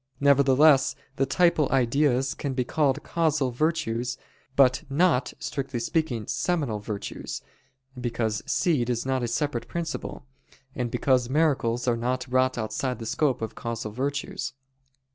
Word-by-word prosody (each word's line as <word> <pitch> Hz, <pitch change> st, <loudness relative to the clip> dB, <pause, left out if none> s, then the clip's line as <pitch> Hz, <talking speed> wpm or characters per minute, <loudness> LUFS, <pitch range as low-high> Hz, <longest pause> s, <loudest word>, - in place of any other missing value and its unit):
Nevertheless, 140 Hz, +1 st, +5 dB, 0.2 s
the 135 Hz, -, +1 dB
"typal 160 Hz, 0 st, +3 dB
ideas" 135 Hz, +1 st, +2 dB
can 140 Hz, -2 st, -4 dB
be 125 Hz, -, +1 dB
called 140 Hz, +2 st, +1 dB
"causal 155 Hz, -6 st, +1 dB
virtues," 125 Hz, -4 st, -1 dB, 0.4 s
but 130 Hz, -2 st, +5 dB
not, 140 Hz, -3 st, +2 dB
strictly 135 Hz, -3 st, -4 dB
speaking, 120 Hz, -3 st, -1 dB
"seminal 145 Hz, -, -1 dB
virtues," 105 Hz, -1 st, -6 dB, 0.5 s
because 115 Hz, -3 st, -2 dB
seed 140 Hz, -9 st, +1 dB
is 120 Hz, 0 st, -1 dB
not 130 Hz, -1 st, 0 dB
a 120 Hz, -, -1 dB
separate 125 Hz, 0 st, -2 dB
principle; 170 Hz, -6 st, -5 dB, 0.5 s
and 125 Hz, -3 st, -2 dB
because 125 Hz, 0 st, +1 dB
miracles 130 Hz, -5 st, +1 dB
are 120 Hz, -1 st, +2 dB
not 125 Hz, +2 st, -1 dB
wrought 130 Hz, 0 st, +2 dB
outside 120 Hz, +3 st, -2 dB
the 115 Hz, -, -7 dB
scope 130 Hz, +1 st, 0 dB
of 110 Hz, -, -4 dB
causal 115 Hz, -2 st, -4 dB
virtues. 140 Hz, +5 st, -3 dB
130 Hz, 135 wpm, -26 LUFS, 120-145 Hz, 0.5 s, Nevertheless